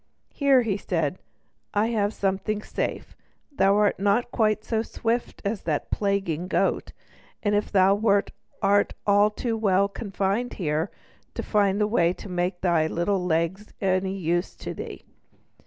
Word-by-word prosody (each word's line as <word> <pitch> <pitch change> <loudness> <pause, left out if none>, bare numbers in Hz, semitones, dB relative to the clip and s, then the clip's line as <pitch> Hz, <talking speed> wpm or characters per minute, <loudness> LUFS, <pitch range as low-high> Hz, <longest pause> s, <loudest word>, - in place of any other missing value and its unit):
"Here," 275 -3 +4 0.2
said 165 -7 -1
he, - - -22 0.6
"I 210 +2 +3
have 210 -3 +1
something 200 +1 -1
safe; - - -4 0.4
thou 195 -8 +3
art 210 -2 +2
not 205 +5 +1
quite 215 -2 +1
so 220 -1 0
swift 230 +1 -3
as 200 0 -1
that 155 -3 -2
plaguing 195 -5 -1
goat; - - 0 0.5
and 205 -1 +1
if 205 0 0
thou 195 -1 +5
wert, 205 -1 +2 0.3
art 200 +1 +3 0.4
too 235 -2 -1
well 200 -3 +2
confined 200 +3 -2
here 160 0 -1 0.5
to - - -3
find 205 -1 +2
the 210 - +3
way 180 -5 +2
to - - -10
make 180 0 -2
thy 170 -4 +2
little 180 +4 0
legs 175 +4 -1
any 190 0 0
use 175 0 -1
to - - -6
thee." - - -8
200 Hz, 150 wpm, -25 LUFS, 180-210 Hz, 0.6 s, thou